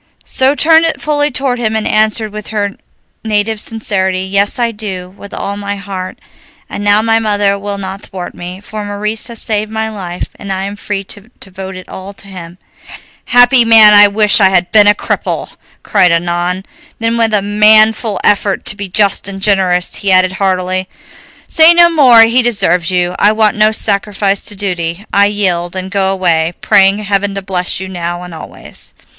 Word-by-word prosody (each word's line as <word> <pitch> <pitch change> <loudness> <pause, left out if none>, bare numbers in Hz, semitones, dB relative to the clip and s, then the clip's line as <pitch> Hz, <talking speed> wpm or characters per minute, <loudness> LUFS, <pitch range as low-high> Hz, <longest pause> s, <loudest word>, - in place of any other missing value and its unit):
She 265 +2 +1
turned 320 +2 +4
it 325 - -1
fully 295 -1 0
toward 260 -2 -2
him 220 -2 -2
and 220 - -2
answered, 215 0 0
with 215 0 -7
her 205 -2 -2 0.5
native 215 0 -1
sincerity, 190 -5 -1
"Yes, 200 +2 0
I 235 -1 0
do, 190 -4 -7
with 200 0 -12
all 200 - -5
my 200 0 -4
heart, 195 -2 -7 0.5
and 205 - -6
now 205 +1 +3
my 225 0 +2
mother 205 -2 +1
will 200 0 -5
not 195 0 -6
thwart 180 -2 -8
me, 180 +2 -9
for 210 0 -7
Maurice 210 +2 -4
has 235 -2 -6
saved 215 -1 -2
my 220 0 -3
life, 180 -4 -6
and 200 - -7
I 190 0 -3
am 200 +1 -5
free 205 -1 -5
to 205 +3 -11
devote 190 0 -9
it 185 - -11
all 190 +1 -9
to 200 - -12
him." 180 -2 -10 0.7
"Happy 245 +1 +4
man, 220 -2 +7
I 205 0 +8
wish 210 +1 +2
I 190 - +6
had 180 -2 0
been 210 -1 +5
a 205 - +5
cripple!" - - -4 0.3
sighed 180 -2 +3
Annon. 175 +2 -2 0.3
Then 230 0 -1
with 230 -1 +1
a 200 - 0
manful 215 +1 +3
effort 200 -1 +1
to - - 0
be 200 -2 -7
just 200 +1 +1
and 195 -1 -5
generous, 190 -3 0
he 200 - -1
added 185 0 +4
heartily, 185 -1 -2 0.6
"Say 325 +1 +5
no 345 0 +5
more, 255 -8 +6
he 230 +3 +3
deserves 200 -7 +1
you; 180 -1 -1
I 210 +1 +3
want 215 -1 +1
no 215 0 +3
sacrifice 200 -2 -1
to 210 - -3
duty; 180 -1 -4
I 200 0 +4
yield, 185 -4 -2
and 190 +1 -5
go 195 -2 0
away, 170 -3 0
praying 195 +1 +3
heaven 200 0 -1
to 195 - -5
bless 180 -2 -2
you 190 - -6
now 175 -1 -5
and 180 -1 -10
always." 160 - -11
200 Hz, 190 wpm, -12 LUFS, 190-215 Hz, 0.7 s, I